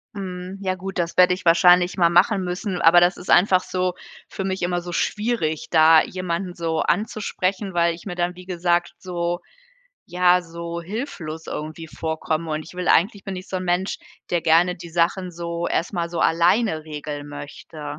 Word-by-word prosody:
Mhm, 185 -1 -6
ja, 185 -1 -1
gut, 190 +1 -7
das 170 -1 -2
werde 180 0 +6
ich 185 - -6
wahrscheinlich 175 +1 +5
mal 170 -2 +4
machen 190 +4 +3
müssen. 180 +1 -3
Aber 175 +2 +7
das 175 +1 +3
ist - - -10
einfach 185 0 +5
so 185 -1 -1 0.4
für 195 - -5
mich 190 0 -2
immer 175 0 0
so 175 0 -7
schwierig, 210 -7 -1
da 160 -1 +6
jemanden, 180 0 -4
so, 165 -1 -2
anzusprechen, 195 +1 -1
weil 170 -1 +2
ich 165 - -12
mir 180 -3 -5
dann, 175 0 -1
wie 180 0 -12
gesagt 175 -1 0
so, 175 -1 -3 0.7
ja, 180 0 +3
so 170 0 -6
hilflos 170 - -6
irgendwie 155 +2 -6
vorkomme 160 0 -3
und 155 0 -2
ich - - -12
will 180 0 -4
eigentlich 200 +3 +3
bin 195 -1 -5
ich 185 +1 -9
so 190 - -3
'n 185 - -4
Mensch, 180 +2 -1 0.3
der 175 - +1
gerne 165 +3 +3
die 170 - -10
Sachen 175 +2 0
so 170 0 -4
erstmal 170 -1 -1
so 170 0 -4
alleine 170 0 +2
regeln 150 -1 -6
möchte. 145 +1 -8
175 Hz, 185 wpm, -22 LUFS, 165-185 Hz, 0.7 s, Aber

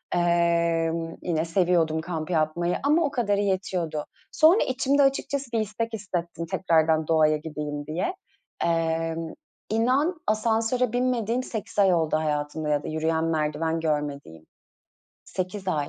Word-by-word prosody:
Eee, 170 -1 +2 0.3
yine 165 -2 -1
seviyordum 165 -2 +2
kamp 160 -1 -4
yapmayı 170 +1 0
ama 305 +4 +3
o 285 - 0
kadarı 205 -6 +1
yetiyordu. 180 -6 -1 0.3
Sonra 325 +7 +5
içimde 275 +2 +2
açıkçası 275 -1 0
bir 225 - +2
istek 220 +2 -3
hissettim, 175 -5 -4
tekrardan 160 -3 +2
doğaya 155 -1 +4
gideyim 150 -1 -5
diye. 180 - -2 0.5
Eee, 165 -1 0 0.5
inan, 265 +10 +1
asansöre 225 +2 +1
binmediğim 245 -1 0
8 220 -3 -5
ay 190 -2 +5
oldu 160 -2 +1
hayatımda 150 0 -2
ya 145 0 +1
da - - -6
yürüyen 160 +1 0
merdiven 160 +1 0
görmediğim. 145 - -3 0.8
8 185 +1 -4
ay. 150 -5 0
170 Hz, 130 wpm, -25 LUFS, 160-220 Hz, 0.8 s, Sonra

